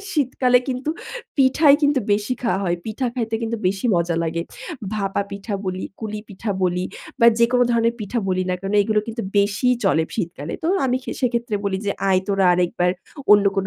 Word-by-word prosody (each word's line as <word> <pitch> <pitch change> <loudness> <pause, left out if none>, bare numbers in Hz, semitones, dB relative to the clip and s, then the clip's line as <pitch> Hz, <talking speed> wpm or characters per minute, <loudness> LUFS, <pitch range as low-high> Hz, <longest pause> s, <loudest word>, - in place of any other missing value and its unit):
শীতকালে 255 -3 +3
কিন্তু 255 +3 -2 0.5
পিঠাই 280 +2 +5
কিন্তু 285 -2 +3
বেশি 210 +5 0
খাওয়া 225 -5 +1
হয়। 175 -1 0
পিঠা 225 +4 -2
খাইতে 225 -3 -2
কিন্তু 230 0 -1
বেশি 195 +5 0
মজা 170 0 0
লাগে। 165 +1 -1 0.5
ভাপা 200 -1 -1
পিঠা 200 +1 -5
বলি, 185 0 -3 0.2
কুলি 215 -1 -4
পিঠা 205 +2 -5
বলি 180 0 +1 0.4
বা 235 - +7
যেকোনো 245 +1 +4
ধরনের 230 0 +2
পিঠা 215 +3 -2
বলি 185 0 +1
না - - +1
কেনো, 195 +1 -3
এইগুলো 215 +1 +1
কিন্তু 230 +1 -4
বেশিই 205 +5 +3
চলে 160 -4 +3
শীতকালে। 165 -6 -4
তো - - -1 0.2
আমি 250 0 +1
খে - - -6
সেক্ষেত্রে 235 -2 0
বলি 195 -1 0
যে - - +2 0.2
"আয় 185 -1 +4
তোরা 195 -1 +2
আরেকবার। 175 0 +1 0.4
অন্য 205 -1 +6
কোন 190 - 0
210 Hz, 185 wpm, -22 LUFS, 190-245 Hz, 0.5 s, বা